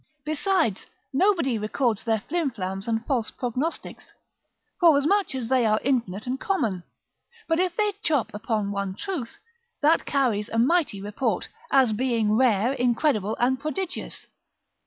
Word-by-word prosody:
Besides, 310 - 0 0.3
nobody 285 - +2
records 220 +1 0
their 225 -2 0
flimflams 220 - -2
and 225 0 -1
false 245 -5 0
prognostics, 255 +6 -4 0.7
forasmuch 335 +2 +4
as 250 -3 -3
they 255 0 +3
are 215 -1 +3
infinite 230 -7 -1
and 255 +1 -2
common; 225 - -1 0.7
but 325 0 +1
if 365 -1 0
they 420 -1 +2
chop 295 - 0
upon 210 -1 -2
one 200 -1 -3
truth, 320 - -5 0.4
that 320 +3 +3
carries 235 -7 +1
a 225 - -3
mighty 270 - +2
report, 205 +6 -2 0.2
as 260 -5 +4
being 230 -2 +1
rare, 235 0 +3
incredible, 240 -4 +1
and 255 +2 +2
prodigious. 340 +5 -4
250 Hz, 135 wpm, -25 LUFS, 215-310 Hz, 0.7 s, forasmuch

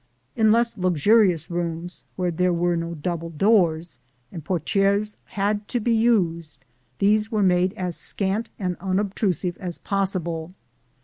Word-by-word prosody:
In 220 -1 +4
less 235 -1 +2
luxurious 185 0 +3
rooms, 170 0 -3
where 180 -1 -1
there 180 +2 +1
were 175 0 +1
no 170 0 -3
double 165 +1 -4
doors, 165 - +1 0.3
and 165 - -8
portières 195 +5 0
had 205 +1 -2
to 245 - -1
be 235 +2 0
used, 170 - +1 0.3
these 210 +2 +2
were 215 -2 +1
made 185 0 +2
as 180 -5 -3
scant 205 +3 0
and 180 -3 -2
unobtrusive 190 -1 -1
as 180 -4 -5
possible. 180 -4 -2
185 Hz, 135 wpm, -23 LUFS, 170-205 Hz, 0.3 s, In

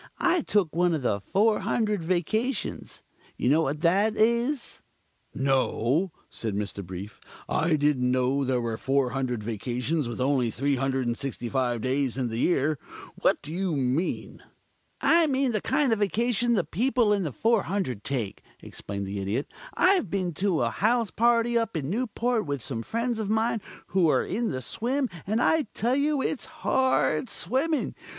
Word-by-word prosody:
I 355 -1 +2
took 195 - +1
one 175 -1 +3
of 145 - -4
the 100 -4 +1
400 210 - +1
Vacations. 195 - -2 0.3
Know 145 +6 +3
what 150 0 -2
that 200 +6 +3
is?" 235 +5 +1 0.5
"No," 135 - +1 0.2
said 110 -3 -3
Mr. 100 -1 -3
Brief. 95 +3 -8 0.3
"I 165 0 +2
didn't 145 -4 +2
know 130 +2 +1
there 130 -1 +1
were 115 -2 -2
400 130 -3 0
Vacations 125 +7 -2
with 120 - -5
only 130 -2 +2
365 130 -2 -1
days 130 0 0
in 125 -3 -1
the 115 +1 -3
year. 150 -1 +1 0.4
What - - +2
do 150 - -7
you 180 -1 -1
mean?" 135 +6 -1 0.6
"I 335 -1 +5
mean 270 -2 +1
the 215 -3 -1
kind 290 -6 +2
of 220 - -1
Vacation 235 +3 +1
the 195 -6 +2
people 225 - +1
in 200 - +1
the 160 -6 -2
400 195 - 0
take," 120 -8 -3 0.2
explained 100 0 -5
the 100 +1 -4
Idiot. 105 +8 -3 0.2
"I've 370 - +3
been 180 -1 -1
to 185 -9 +2
a 115 - 0
house 225 - +1
party 235 +1 +3
up 225 -6 -2
in 145 0 -3
Newport 235 -2 -1
with 140 -5 -2
some 115 -5 -3
friends 230 - -2
of 210 -2 -2
mine 220 0 +1 0.3
who're 175 -4 +3
in 230 +5 -1
the 130 - -3
swim, 250 - -1 0.2
and 215 +3 +1
I 310 +1 +2
tell 240 +5 +1
you 285 0 +1
it's 285 - -2
hard 265 -5 +1
swimming. 270 - 0
170 Hz, 155 wpm, -27 LUFS, -, 0.6 s, I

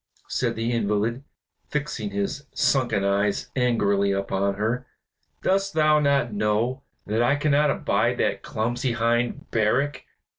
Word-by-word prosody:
said - - -1
the 115 +1 -1
invalid, 115 +2 0 0.5
fixing 145 -8 -3
his 100 +7 -3
sunken 120 -7 +2
eyes 100 +1 0
angrily 100 -6 +2
upon 100 0 -1
her. 115 +5 -2 0.6
"Dost 195 -1 +1
thou 155 -1 +4
not 140 -5 +1
know 105 +5 0 0.2
that 110 +3 0
I 120 +4 +3
cannot 145 0 +2
abide - - +1
that - - 0
clumsy 120 +3 -2
hind, 120 +1 0
Barak. 125 +7 +1
120 Hz, 125 wpm, -24 LUFS, 105-140 Hz, 0.6 s, thou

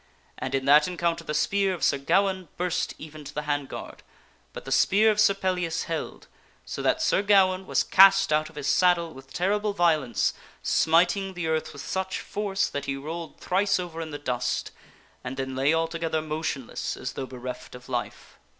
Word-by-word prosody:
And 130 +1 -2
in 135 -1 -1
that 150 +3 +6
encounter 170 -2 -1
the 150 -1 -4
spear 195 +2 +1
of 170 - -8
Sir 140 - +3
Gawaine 190 +5 +1
burst 180 0 -1
even 155 0 -10
to 145 +1 -10
the 150 - -2
hand 145 -2 -2
guard, - - -8 0.5
but - - -9
the 135 - -7
spear 210 +10 +4
of 210 - -2
Sir 200 -1 +5
Pellias 180 -4 -1
held, 165 -1 -5 0.4
so - - -5
that 320 - +1
Sir 260 - +3
Gawaine 190 -2 +3
was - - +2
cast 195 -2 +6
out 155 0 +1
of - - -19
his 145 - -5
saddle 170 +2 +3
with 135 0 -14
terrible 205 +3 0
vio 175 -4 +4
overthrbweth - - -6
lence, 120 -3 0 0.3
smiting 175 +4 +2
the 175 -2 -3
earth 160 0 -1
with 140 - -9
such 190 0 -2
force 205 -1 -1
that 140 0 -5
he 135 - -2
rolled 160 +3 -7
thrice 195 +2 +1
sir 185 - +2
Gawaine 175 - -8
over 165 +1 -6
in 160 - -5
the 145 - -5
dust 125 -3 -2 0.5
and 130 +1 -6
then 130 -1 -3
lay 135 +3 +2
altogether 165 0 0
motionless 155 -5 -4
as - - -5
though 135 - -5
bereft 125 -1 -8
of 125 - -12
life. 125 -2 -5
165 Hz, 205 wpm, -26 LUFS, 145-190 Hz, 0.5 s, that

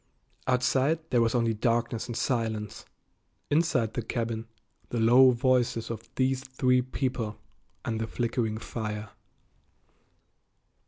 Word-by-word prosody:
Outside 130 +4 +2
there 120 -2 +4
was 115 +1 +2
only 115 -2 +2
darkness 115 +1 0
and 120 -1 -4
silence; 110 -4 -2 0.7
inside 145 -8 +2
the - - -2
cabin, 115 0 -3 0.4
the 120 - -2
low 125 +4 +7
voices 120 -2 +1
of 115 - -7
these 130 0 +1
three 130 -1 +2
people 125 -4 -3 0.5
and 110 -1 -2
the 115 - -2
flickering 115 -2 -1
fire. 110 -2 -5
120 Hz, 115 wpm, -28 LUFS, 115-130 Hz, 0.7 s, low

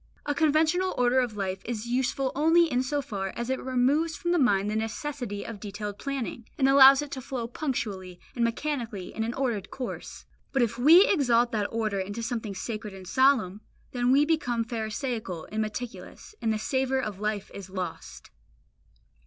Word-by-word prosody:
A 290 - 0
conventional 320 +5 +2
order 250 +1 +3
of 240 -4 -1
life 190 -1 -3
is 230 -1 -4
useful 260 +2 0
only 325 +4 +4
in 250 0 +2
so 285 +2 -1
far 195 -5 -4
as 235 +2 -3
it 260 - -1
removes 270 +6 +1
from 345 - -2
the 350 - +3
mind 205 -7 +3
the - - -2
necessity 225 -1 -4
of 230 -3 -7
detailed 205 0 -6
planning, 260 -4 -4
and 270 - +3
allows 270 0 +8
it 290 - -9
to 260 - -5
flow 245 -2 -4
punctually 205 - -4
and 240 - -1
mechanically 230 -5 -2
in 220 - -2
an 230 +3 -3
ordered 235 -8 -2
course. 255 - -7 0.3
But 270 -3 +3
if 230 0 -2
we 330 +10 +8
exalt 245 - +3
that 210 -2 -1
order 215 -3 -1
into 205 +4 -4
something 225 -3 -3
sacred 215 0 -5
and 190 -1 -11
solemn, 220 -5 +3 0.3
then 245 0 +1
we 285 +3 +5
become 250 -8 0
pharisaical 220 - -4
and 215 +1 -1
meticulous, 230 - -6
and 225 - +1
the 215 - 0
savour 265 +4 0
of 210 -6 -4
life 210 -1 -3
is 195 -2 -8
lost. 185 -1 -6
240 Hz, 180 wpm, -27 LUFS, 215-270 Hz, 0.3 s, allows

